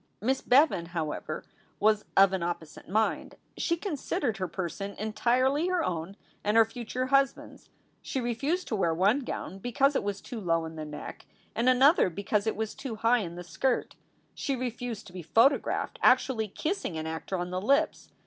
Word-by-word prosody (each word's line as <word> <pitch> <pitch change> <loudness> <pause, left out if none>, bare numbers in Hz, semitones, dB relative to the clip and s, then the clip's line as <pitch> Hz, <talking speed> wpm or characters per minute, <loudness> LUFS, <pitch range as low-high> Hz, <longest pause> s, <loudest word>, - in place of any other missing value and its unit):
Miss 260 +5 0
Bevan, 255 - +4
however, 155 -1 -3 0.4
was 215 0 +3
of 195 0 +7
an 190 - -1
opposite 170 -3 -5
mind. 220 +3 0 0.2
She 335 - 0
considered 290 - -2
her 185 -1 -2
person 190 +3 -5
entirely 255 - +1
her 365 -2 +1
own 175 +3 -4 0.3
and 210 +2 +2
her 225 - +7
future 240 +2 -4
hus 275 0 +4
band - - -12
s. - - -19 0.3
She 265 - -3
refused 275 +9 -1
to 220 - 0
wear 170 -5 +1
one 200 +10 +3
gown 195 -7 -5
because 270 +6 +2
it - - +2
was 200 -1 -2
too 235 - -7
low 165 -3 +1
in 160 0 -8
the 155 -1 -5
neck, 150 0 -8 0.3
and 240 +2 +2
another 265 - +5
because 200 +4 -1
it 220 - +1
was 220 0 -3
too 260 -5 -6
high 230 +3 +3
in 170 -5 -5
the 175 - -7
skirt. 250 +8 -1 0.4
She 275 - -2
refused 245 -3 -4
to 180 - -13
be 185 - -6
photographed 230 - +2
actually 220 -5 +3
kissing 305 - -3
an 155 - -4
actor 160 +4 -4
on 175 0 -4
the 185 0 -2
lips. 280 +9 +1
220 Hz, 185 wpm, -29 LUFS, 185-260 Hz, 0.4 s, of